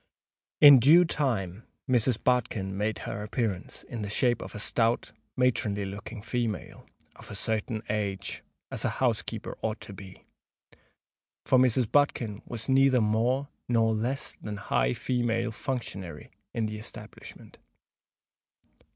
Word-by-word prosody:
In 145 -3 +11
due 160 +9 +7
time 115 - -1 0.3
Mrs. 125 -2 +2
Bodkin 110 -6 0
made 105 +2 -1
her 105 - -4
appearance, 105 -2 -3
in 115 - -7
the 100 - -4
shape 120 +3 +1
of - - -8
a - - -5
stout, 115 +2 +1 0.3
matronly 110 -5 +1
looking 100 +2 -7
female, 115 -4 -3 0.3
"of - - -11
a - - -6
certain 110 +2 -1
age," 100 -2 -2 0.3
as - - -2
a - - +2
housekeeper - - -1
ought 110 0 -2
to 100 0 -8
be;—for 95 +6 -6
Mrs. 125 -2 +3
Bodkin 120 -7 +1
was 115 -2 -4
neither 135 -1 +5
more 120 +6 +1 0.2
nor 115 -2 +3
less 120 +5 -2
than 105 -1 -5
that 100 - -8
high - - +3
female 120 -2 -1
functionary 100 - -5 0.2
in 115 - -1
the 105 0 -4
establishment. 110 - -10
110 Hz, 135 wpm, -28 LUFS, 105-125 Hz, 0.3 s, In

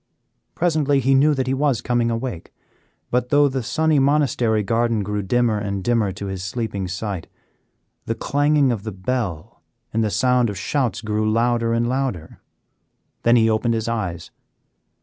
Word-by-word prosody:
Presently 155 -5 +2
he 135 +1 +2
knew 145 +3 +4
that 130 -1 -1
he 130 - -1
was 135 -3 +1
coming 120 -1 0
awake, 115 -6 -4 0.6
but 125 0 0
though 145 0 +5
the 135 -1 -2
sunny 150 +6 +1
monastery 135 -6 +2
garden 115 0 0
grew 105 +1 -2
dimmer 110 +2 +1
and 100 -2 -3
dimmer 115 -4 +1
to 100 - -7
his 95 -2 -5
sleeping 100 -2 -3
sight, 95 -1 -4 0.8
the 115 - -1
clanging 145 +2 +2
of 115 -4 -2
the 110 +1 -5
bell 95 -1 -4 0.3
and 115 +1 +1
the 110 - 0
sound 125 +1 +2
of 100 - -5
shouts 120 +2 -1
grew 110 0 0
louder 115 0 +1
and 115 +1 +1
louder. 125 -11 -3 0.8
Then 120 +1 +4
he 115 -2 +4
opened 115 +1 +1
his 110 0 -2
eyes. 95 -8 -3
115 Hz, 165 wpm, -21 LUFS, 105-130 Hz, 0.8 s, though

